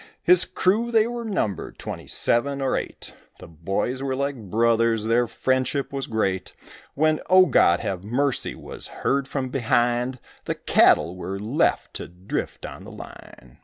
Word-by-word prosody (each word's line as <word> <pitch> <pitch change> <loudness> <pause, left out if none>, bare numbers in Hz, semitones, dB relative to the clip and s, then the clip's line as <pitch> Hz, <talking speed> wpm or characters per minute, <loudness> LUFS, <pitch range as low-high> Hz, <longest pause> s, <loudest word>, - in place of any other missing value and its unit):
His 180 +1 +5
crew 220 +6 +1
they 220 -2 +4
were 240 0 -4
numbered 180 - -3
twenty - - -7
seven 140 +4 +1
or 135 -1 0
eight, - - -5 0.2
The - - -11
boys 95 - -3
were 135 -1 -1
like 140 +1 -1
brothers, 115 0 +2
their 120 +2 +2
friendship 130 +4 -1
was 135 -1 -3
great, 95 -4 -1 0.4
When 155 +1 +2
"O 185 0 +7
God, 90 - +4
have 95 -1 -3
mercy" 130 +5 -1
was - - -7
heard 140 0 -1
from 135 -2 -3
behind, 120 0 +1 0.3
The - - -2
cattle 85 +2 +3
were 95 +1 -5
left 115 +10 0
to - - -7
drift 90 +2 -5
on - - -9
the - - -10
line. - - -13
130 Hz, 160 wpm, -24 LUFS, 110-140 Hz, 0.4 s, O